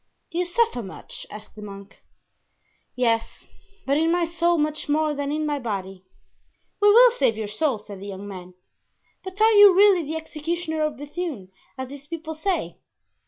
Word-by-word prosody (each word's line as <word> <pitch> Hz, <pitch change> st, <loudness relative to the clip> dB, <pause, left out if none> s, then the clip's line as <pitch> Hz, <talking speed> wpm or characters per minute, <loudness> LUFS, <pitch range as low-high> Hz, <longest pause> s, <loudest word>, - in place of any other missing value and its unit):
"Do 340 Hz, -, -2 dB
you 360 Hz, -, +1 dB
suffer 375 Hz, -, +1 dB
much?" 190 Hz, -4 st, -9 dB
asked 210 Hz, +1 st, -11 dB
the 215 Hz, -, -10 dB
monk. 200 Hz, 0 st, -11 dB, 0.9 s
"Yes, 230 Hz, -2 st, -1 dB, 0.4 s
but 280 Hz, +1 st, +2 dB
in 325 Hz, +2 st, +2 dB
my 350 Hz, 0 st, +2 dB
soul 340 Hz, +1 st, +1 dB
much 305 Hz, 0 st, -2 dB
more 305 Hz, +1 st, +2 dB
than 285 Hz, 0 st, -3 dB
in 305 Hz, +1 st, -1 dB
my 295 Hz, -1 st, -1 dB
body." 195 Hz, -5 st, -5 dB, 0.8 s
"We 415 Hz, 0 st, +5 dB
will 485 Hz, +3 st, +8 dB
save 240 Hz, -, +1 dB
your 220 Hz, -1 st, -3 dB
soul," 245 Hz, +4 st, 0 dB
said 205 Hz, -2 st, -11 dB
the 200 Hz, -, -8 dB
young 200 Hz, 0 st, -7 dB
man; 185 Hz, -2 st, -9 dB, 0.7 s
"but 375 Hz, +1 st, -8 dB
are 440 Hz, +1 st, +6 dB
you 410 Hz, -3 st, +8 dB
really 395 Hz, -2 st, +6 dB
the 315 Hz, 0 st, -5 dB
executioner 320 Hz, +1 st, -4 dB
of 305 Hz, -1 st, -2 dB
Bethune, 290 Hz, -, -6 dB, 0.3 s
as 260 Hz, 0 st, -4 dB
these 285 Hz, 0 st, -11 dB
people 325 Hz, 0 st, -6 dB
say?" 360 Hz, +4 st, -2 dB
300 Hz, 175 wpm, -24 LUFS, 215-345 Hz, 0.9 s, will